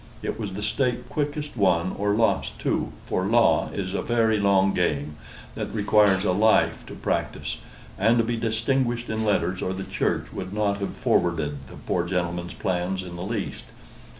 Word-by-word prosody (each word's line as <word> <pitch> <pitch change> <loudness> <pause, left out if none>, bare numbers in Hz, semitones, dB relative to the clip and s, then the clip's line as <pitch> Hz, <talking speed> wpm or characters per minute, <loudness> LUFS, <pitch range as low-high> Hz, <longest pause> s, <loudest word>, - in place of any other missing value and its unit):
It - - -3
was 105 -4 -4
the 105 +2 -5
stake 125 +3 0
quickest 150 -1 -3
won 95 -4 +2
or 100 0 +1
lost 115 +1 +1
too; - - -1
for 95 - -1
law 115 +2 +4
is 95 -2 -4
a - - 0
very 115 -2 +2
long 95 -1 +3
game 75 -4 0 0.4
that - - -4
requires 105 -2 +3
a 90 - +3
life 110 +4 +3
to - - -8
practise; - - -2 0.4
and 115 +4 +4
to 115 - +4
be 120 +1 -1
distinguished 120 +1 0
in 110 0 -1
letters 95 -3 +1
or 95 - -1
the 95 +1 -4
Church - - -2
would 95 +1 -5
not 105 -1 0
have 100 - -4
forwarded 75 -5 0
the - - -11
poor 85 - -1
gentleman's 85 -1 -2
plans 95 +1 -1
in 90 -1 -8
the 85 - -6
least. 105 +2 -4
100 Hz, 175 wpm, -25 LUFS, 90-115 Hz, 0.4 s, law